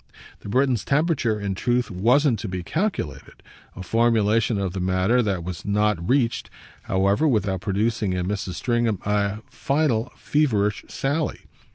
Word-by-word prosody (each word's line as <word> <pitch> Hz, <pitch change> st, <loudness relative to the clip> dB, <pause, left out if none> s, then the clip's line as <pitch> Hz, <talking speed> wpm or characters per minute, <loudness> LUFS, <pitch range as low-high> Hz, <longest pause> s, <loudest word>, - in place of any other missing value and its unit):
The -, -, -9 dB
Briton's 130 Hz, 0 st, +2 dB
temperature 140 Hz, -7 st, +1 dB
in 100 Hz, -1 st, -2 dB
truth 120 Hz, +5 st, 0 dB
wasn't 120 Hz, +6 st, +3 dB
to 110 Hz, -, -4 dB
be 90 Hz, -2 st, -4 dB
calculated 85 Hz, -, -3 dB, 0.3 s
a 95 Hz, -, -7 dB
formulation 115 Hz, 0 st, +2 dB
of 95 Hz, -3 st, -2 dB
the 95 Hz, -, -3 dB
matter 95 Hz, +6 st, +2 dB
that 100 Hz, -6 st, -1 dB
was 90 Hz, -1 st, -6 dB
not 105 Hz, -4 st, 0 dB
reached, 125 Hz, -3 st, +1 dB, 0.3 s
however, 100 Hz, +10 st, +1 dB
without 105 Hz, -, 0 dB
producing 105 Hz, 0 st, 0 dB
in 90 Hz, -1 st, -1 dB
Mrs. 95 Hz, -3 st, -3 dB
Stringham 120 Hz, -2 st, 0 dB
a 105 Hz, +1 st, 0 dB
final 135 Hz, -5 st, 0 dB
feverish 105 Hz, -9 st, 0 dB
sally. 145 Hz, +3 st, -2 dB
105 Hz, 145 wpm, -23 LUFS, 95-125 Hz, 0.3 s, wasn't